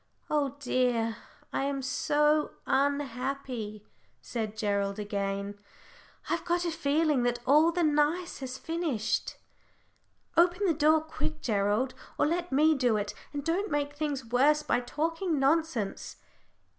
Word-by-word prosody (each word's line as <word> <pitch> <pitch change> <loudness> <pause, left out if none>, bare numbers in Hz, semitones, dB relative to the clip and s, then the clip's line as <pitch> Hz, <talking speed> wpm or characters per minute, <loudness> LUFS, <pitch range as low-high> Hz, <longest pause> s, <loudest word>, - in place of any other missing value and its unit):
"Oh 285 -3 +1
dear, 245 -4 0 0.4
I 270 - 0
am 275 -1 -2
so 300 +2 +2
unhappy!" 265 -5 -1 0.3
said 220 -3 -4
Gerald, 200 -1 0
again. 200 -1 -3 0.7
"I've 335 - -1
got 350 0 0
a 340 - 0
feeling 300 -2 +1
that 240 0 +1
all 305 +5 +5
the 345 0 0
nice 305 +3 +1
has 260 -1 -5
finished." 300 -11 -2 1.0
"Open 350 +4 +4
the 345 - +3
door 310 +1 +4
quick, 315 0 -4
Gerald, 210 +4 +1 0.2
or - - +3
let 345 +3 -1
me 305 +4 +5
do 250 -6 +2
it, 205 0 -3 0.2
and 285 -1 -4
don't 365 +6 0
make 290 -1 -1
things 290 -3 -3
worse 280 +6 +3
by - - +1
talking 325 +6 -1
nonsense." 275 -6 0
280 Hz, 130 wpm, -29 LUFS, 235-315 Hz, 1.0 s, all